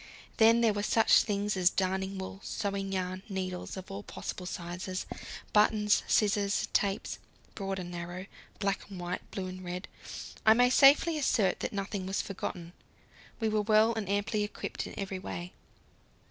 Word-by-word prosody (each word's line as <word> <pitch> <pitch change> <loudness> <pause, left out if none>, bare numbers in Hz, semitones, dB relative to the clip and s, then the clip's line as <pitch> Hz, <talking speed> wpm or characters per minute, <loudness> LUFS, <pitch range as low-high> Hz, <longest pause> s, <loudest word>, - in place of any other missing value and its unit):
Then 230 +1 +6
there 225 -2 +4
were 205 - -1
such 220 +2 +5
things 205 -1 -1
as 180 -1 +4
darning 190 +1 -1
wool, 190 0 -6
sewing 200 -2 -3
yarn, 185 0 -2
needles 185 -1 -4
of 190 +2 -8
all 195 +1 -5
possible 180 -2 -6
sizes, 180 +2 -4 0.5
buttons, 210 0 +4
scissors, 205 -1 +2
tapes 200 +1 0 0.3
broad 195 -2 -3
and 175 -2 -5
narrow, 175 +1 -5 0.3
black 200 -1 -2
and 195 -2 -8
white, 175 +1 -3
blue 190 - -4
and 185 0 -7
red. 180 +1 -5 0.6
I 220 0 +7
may 245 +1 +5
safely 295 +4 +6
assert 210 -9 +2
that - - -2
nothing 195 -1 -3
was 195 - -1
forgotten; 175 -3 -5 0.7
we 225 - +1
were 215 -1 +2
well 215 +2 +4
and 220 -4 -4
amply 205 +1 +1
equipped 205 - -4
in - - -10
every 195 -1 -3
way. 90 - -6
195 Hz, 160 wpm, -31 LUFS, 185-210 Hz, 0.7 s, I